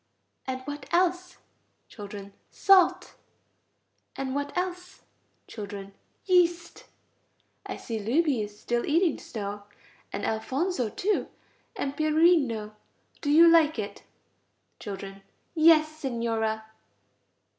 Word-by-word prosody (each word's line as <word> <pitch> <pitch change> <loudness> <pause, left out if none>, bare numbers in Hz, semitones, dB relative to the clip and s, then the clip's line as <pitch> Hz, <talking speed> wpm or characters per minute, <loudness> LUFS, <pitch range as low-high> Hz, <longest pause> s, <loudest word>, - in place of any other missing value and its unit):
And 260 0 -3
what 290 +2 -8
else? 360 +1 +1 0.5
Children. 200 -1 -9 0.2
Salt. 380 -3 +4 1.0
And 265 -1 -3
what 285 +4 -3
else? 360 0 -4 0.4
Children. 200 -2 -8 0.3
Yeast. 345 -2 +1 0.8
I - - -5
see 225 -3 -5
Luigi 260 +4 +1
is 210 0 -7
still 240 0 -1
eating 330 +1 +2
snow, 205 -2 -6 0.5
and 200 - -4
Alfonso 255 - -1
too, 400 - -1 0.5
and 275 0 -3
Pierino. 305 -9 +2 0.5
Do 290 - -2
you 325 +3 +7
like 325 -3 +5
it? 210 -2 -5 0.8
Children. 195 -1 -7 0.3
Yes, 315 -2 +6
Signora. 225 -4 -2
275 Hz, 100 wpm, -27 LUFS, 220-335 Hz, 1.0 s, you